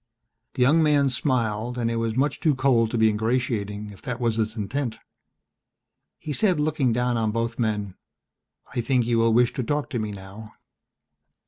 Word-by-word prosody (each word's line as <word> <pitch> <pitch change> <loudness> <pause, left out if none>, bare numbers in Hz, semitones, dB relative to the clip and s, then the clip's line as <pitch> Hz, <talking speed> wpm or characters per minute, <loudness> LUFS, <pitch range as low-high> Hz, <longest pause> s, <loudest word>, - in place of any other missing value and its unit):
The 125 - +3
young 150 +6 +4
man 145 -3 +3
smiled 120 -3 -1
and 115 -1 0
it 115 - -1
was 115 -1 -1
much 135 +3 0
too 155 -4 +2
cold 130 -4 +3
to 120 - -2
be 110 0 +4
ingratiating 105 -2 -1
if 100 - -14
that 125 -2 -4
was 115 -2 0
its 110 0 -1
intent. 115 +2 -3 1.2
He 150 - -5
said, 185 -1 +2
looking 150 -4 +1
down 125 +1 0
on 110 -1 0
both 115 +2 -2
men, 105 -4 -1 0.8
"I 125 - 0
think 125 0 +1
you 115 -1 +1
will 115 0 +3
wish 120 +2 +3
to 130 - -2
talk 150 +3 -2
to 120 - -1
me 110 -1 -2
now." 100 +2 -10
120 Hz, 185 wpm, -24 LUFS, 110-130 Hz, 1.2 s, young